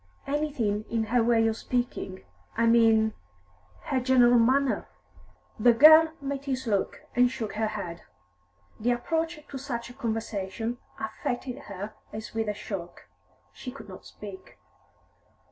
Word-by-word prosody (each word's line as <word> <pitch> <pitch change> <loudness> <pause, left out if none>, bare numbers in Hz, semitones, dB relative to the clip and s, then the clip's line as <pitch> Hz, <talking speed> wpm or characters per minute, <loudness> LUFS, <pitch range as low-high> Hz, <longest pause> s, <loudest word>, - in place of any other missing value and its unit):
Anything 275 -8 -1
in 230 -1 0
her 235 +3 +2
way 230 -1 +3
of 225 -1 +1
speaking, 240 -7 -3 0.3
I 230 - +3
mean 225 -1 +5 0.7
her 260 - 0
general 245 -1 +5
manner?" 265 +3 +2 0.7
The 240 +2 +6
girl 315 +5 +8
met 280 0 -4
his 260 -1 -2
look, 205 -4 -1
and 245 +1 +5
shook 225 -4 -5
her 220 +1 0
head. 195 -6 -5 0.8
The 240 +3 +2
approach 325 +6 -2
to 275 - -7
such 240 -3 -5
a - - -12
conversation 225 0 -3 0.2
affected 245 +4 -4
her 200 +2 -6 0.2
as 215 +1 -7
with 225 -1 -1
a 210 - -2
shock; 185 -4 -7 0.4
she 255 - -8
could 225 -5 -11
not 185 - -10
speak. 200 -2 -11
235 Hz, 140 wpm, -27 LUFS, 215-260 Hz, 0.8 s, girl